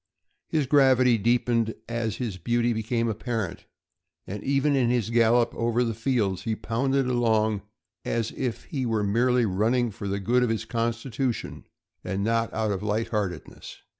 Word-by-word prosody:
His 155 -3 0
gravity 130 -4 +4
deepened 115 0 +1
as 115 -2 -2
his 110 -6 -4
beaut}* 120 +5 +1
became 115 +1 -1
apparent, 110 -3 -3 0.6
and 100 +2 -6
even 140 +1 +2
in 125 -3 +2
his 120 -2 0
gallop 115 0 +3
over 120 +1 +1
the 115 -2 -1
fields 110 -5 0
he 110 +2 -2
pounded 135 +5 0
along 110 -4 +1 0.4
as 115 -2 -1
if 125 -4 -3
he 135 -4 -4
were 110 -3 0
merely 120 +4 +2
running 110 +5 +1
for 100 0 -6
the 100 +1 -1
good 120 +6 +2
of 125 - +2
his 110 -1 -1
constitution 115 +1 -3 0.4
and 95 +2 -2
not 115 +1 +1
out 110 -1 -1
of 95 -1 -2
light 105 +2 -1
heartedness. 100 -6 -4
115 Hz, 160 wpm, -26 LUFS, 110-125 Hz, 0.6 s, gravity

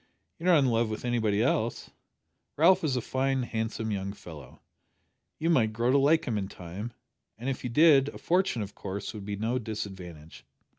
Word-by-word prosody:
You're 175 +3 0
not 170 - +7
in 140 - +3
love 115 -2 +1
with 110 +3 -5
anybody 110 -3 +1
else. 120 -2 -1 0.7
Ralph 170 +5 +5
is 145 -5 +1
a 125 - 0
fine 130 +1 0
handsome 110 -1 -3
young 100 -1 -3
fellow. 75 -10 -12 0.8
You 165 +2 +1
might 110 -8 +3
grow 120 +3 +1
to 140 - +5
like 155 +4 +3
him 110 -5 -1
in 95 - -3
time 95 +5 -7 0.5
and 120 +4 -4
if 135 - -4
you 125 - -2
did, 140 +1 +5
a - - -10
fortune, 175 - +1
of 100 - -9
course, 100 +1 -6
would 105 -3 -8
be 105 0 -3
no 115 +5 -1
disadvantage. 95 -8 -7
115 Hz, 190 wpm, -28 LUFS, 100-135 Hz, 0.8 s, not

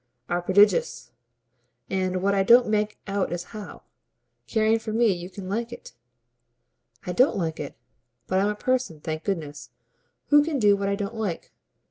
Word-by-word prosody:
"are 175 0 0
prodigious. 190 - +3 0.8
And 185 -1 -1
what 200 +1 +2
I 195 - +2
don't 240 +5 +6
make 210 0 0
out 200 -1 -1
is 175 0 -3
how, 210 -2 -9 0.6
caring 220 0 +2
for 220 0 -6
me, 225 -2 +3
you 175 0 -7
can 195 -1 -9
like 230 +4 -3
it." 240 - -10 1.1
"I 180 - -3
don't 250 +8 +3
like 160 -4 -2
it, 145 - -6 0.5
but 185 - 0
I'm 200 +2 +2
a 210 - -2
person, 255 -8 -1
thank 155 +1 -5
goodness, 150 -9 -4 0.6
who 295 0 +6
can 310 -1 -2
do 205 -4 +4
what 200 0 -2
I 200 - +1
don't 200 +2 -4
like." 215 -7 -4
200 Hz, 170 wpm, -25 LUFS, 180-220 Hz, 1.1 s, don't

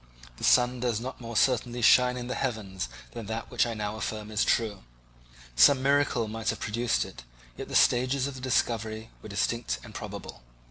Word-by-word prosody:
The - - -10
sun 125 0 +4
does 120 -3 0
not 130 +2 -7
more 115 -1 -4
certainly 120 -1 +1
shine 125 +2 +5
in 120 - -5
the 125 - -3
heavens 105 -7 -3 0.2
than 115 -3 -7
that 110 +1 -5
which 120 -1 +2
I 115 - -3
now 105 0 -3
affirm 110 -1 -4
is 110 0 +1
true. 110 -3 0 0.7
Some 130 - +6
miracle 140 -4 +2
might 110 +1 -3
have - - -2
produced 115 +2 0
it, - - -11 0.3
yet - - -7
the - - -5
stages 130 +2 +3
of 140 - -4
the 130 - -9
discovery 115 -3 -1
were - - -10
distinct 100 - -1
and - - -11
probable. - - -8
115 Hz, 190 wpm, -28 LUFS, 110-125 Hz, 0.7 s, Some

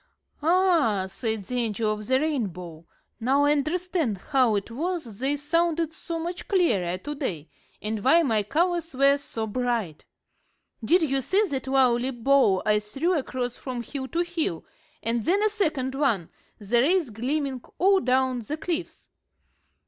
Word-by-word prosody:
"Ah," 325 - +3
said 220 +2 -3
the 250 +6 -3
Angel 220 -2 0
of 210 0 -7
the 260 0 +3
Rainbow, 180 - -3 0.3
"now 265 +5 +2
I 290 - +4
understand 310 - 0
how 255 0 +2
it 200 +3 -3
was 310 - -4
they 270 +3 +1
sounded 330 +2 0
so 335 +1 -5
much 345 +2 -5
clearer 205 - +1
to 290 +10 -6
day, 170 - -4 0.3
and 210 -1 -3
why 330 +6 +5
my 225 -7 +2
colors 335 - -1
were 275 +1 +4
so 235 -6 -5
bright. 225 -8 -2 0.8
Did 345 +9 +4
you 275 -3 +1
see 385 - +2
the 280 -10 -2
lovely 255 -2 +3
bow 245 -6 +3
I 210 -1 +3
threw 270 - -1
across 255 -4 -3
from 250 -3 -5
hill 265 +2 -5
to 335 +5 -1
hill, 335 - -2 0.4
and 230 0 0
then 390 +5 +2
a 430 - +4
second 310 -11 -1
one, 250 - 0 0.3
the 235 +3 +1
rays 330 -1 +2
gleaming 260 +3 -2 0.2
all 390 +2 +4
down 255 -3 +1
the 265 +7 -5
cliffs? 340 +1 -4
265 Hz, 155 wpm, -26 LUFS, 225-325 Hz, 0.8 s, why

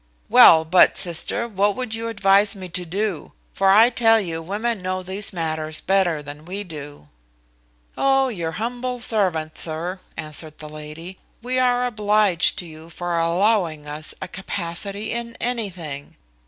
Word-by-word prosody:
Well 160 -1 +8
but, 180 +3 +5
sister, 180 +7 +1
what 205 -2 0
would 250 -3 -3
you 225 +1 -3
advise 200 -2 +3
me 185 -2 -9
to 180 +1 -1
do; 195 0 -3 0.2
for 195 0 +2
I 220 +5 +6
tell 225 -1 +4
you 165 -5 -4
women 210 +5 -3
know 185 0 -3
these 190 +3 -1
matters 160 -2 -3
better 180 -6 +1
than 145 +1 -10
we 190 +5 -5
do?" 145 - -10 0.9
"Oh, 270 0 +2
your 170 -9 -4
humble 245 +3 -4
servant, 180 -9 0
sir," 170 +4 -1 0.2
answered 155 0 -4
the 155 - -9
lady: 155 +4 -9 0.2
"we 255 +1 -1
are 250 -1 +2
obliged 210 -6 +2
to 180 - 0
you 160 0 -12
for 175 0 -3
allowing 170 -2 +1
us 150 +1 -3
a - - -6
capacity 195 +3 -4
in 235 0 -5
anything. 185 - -4
185 Hz, 155 wpm, -22 LUFS, 160-215 Hz, 0.9 s, Well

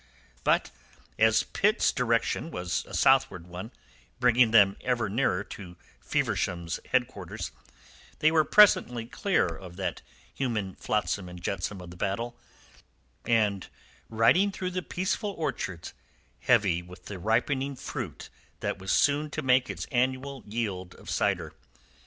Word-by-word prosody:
But - - +2 0.5
as 110 0 +5
Pitt's 210 +4 +2
direction 120 +5 0
was 90 - -2
a - - -12
southward 90 -4 +3
one, 90 +4 -7 0.5
bringing 125 -1 +5
them 100 -3 +6
ever 120 -4 0
nearer 105 -4 +1
to 90 -4 -10 0.2
Feversham's 85 -1 -1
headquarters, 120 -8 -2 0.7
they 155 - +4
were 160 -1 +4
presently 125 - +5
clear 190 - +1
of 90 +1 -7
that 95 0 -3 0.3
human 110 -8 -2
flotsam 100 -3 -2
and 90 0 -9
jetsam 95 +2 -3
of 90 -1 -10
the 90 - -12
battle, 115 +6 -2 0.9
and 105 -5 +2 0.4
riding 115 - +4
through 185 -1 -4
the 185 0 -2
peaceful 190 +4 -2
orchards 120 - -4 0.5
heavy 105 -8 +3
with 90 +1 -14
the 100 -3 -7
ripening 130 +7 0
fruit - - -6 0.3
that - - -2
was 95 +1 -3
soon 145 +1 +3
to - - -4
make 130 -2 +3
its 85 -5 -4
annual 130 +2 0
yield 100 -5 -3
of - - -9
cider. - - 0
115 Hz, 135 wpm, -28 LUFS, 95-130 Hz, 0.9 s, them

